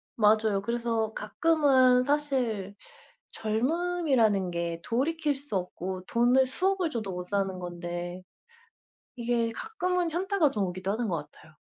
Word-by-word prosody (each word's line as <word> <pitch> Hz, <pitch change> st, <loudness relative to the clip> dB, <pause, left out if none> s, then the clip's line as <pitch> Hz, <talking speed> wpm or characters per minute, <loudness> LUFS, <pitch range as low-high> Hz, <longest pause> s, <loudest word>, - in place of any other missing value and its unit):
맞아요. 215 Hz, -2 st, +3 dB
그래서 230 Hz, -1 st, -1 dB
가끔은 260 Hz, +1 st, +3 dB
사실 255 Hz, -9 st, -1 dB, 0.6 s
젊음이라는 235 Hz, -, +1 dB
게 170 Hz, -1 st, -3 dB
돌이킬 295 Hz, +4 st, 0 dB
수 275 Hz, -6 st, -7 dB
없고 185 Hz, 0 st, -4 dB
돈을 245 Hz, +4 st, +3 dB
수억을 365 Hz, +4 st, 0 dB
줘도 220 Hz, -6 st, -3 dB
못 180 Hz, 0 st, -4 dB
사는 195 Hz, 0 st, -1 dB
건데 175 Hz, 0 st, -5 dB, 1.0 s
이게 235 Hz, -1 st, 0 dB
가끔은 360 Hz, -, -1 dB
현타가 360 Hz, -2 st, +1 dB
좀 210 Hz, -6 st, -1 dB
오기도 185 Hz, +1 st, -3 dB
하는 225 Hz, +1 st, -2 dB
것 175 Hz, -, 0 dB
같아요. 160 Hz, -, -19 dB
230 Hz, 270 characters per minute, -28 LUFS, 195-290 Hz, 1.0 s, 맞아요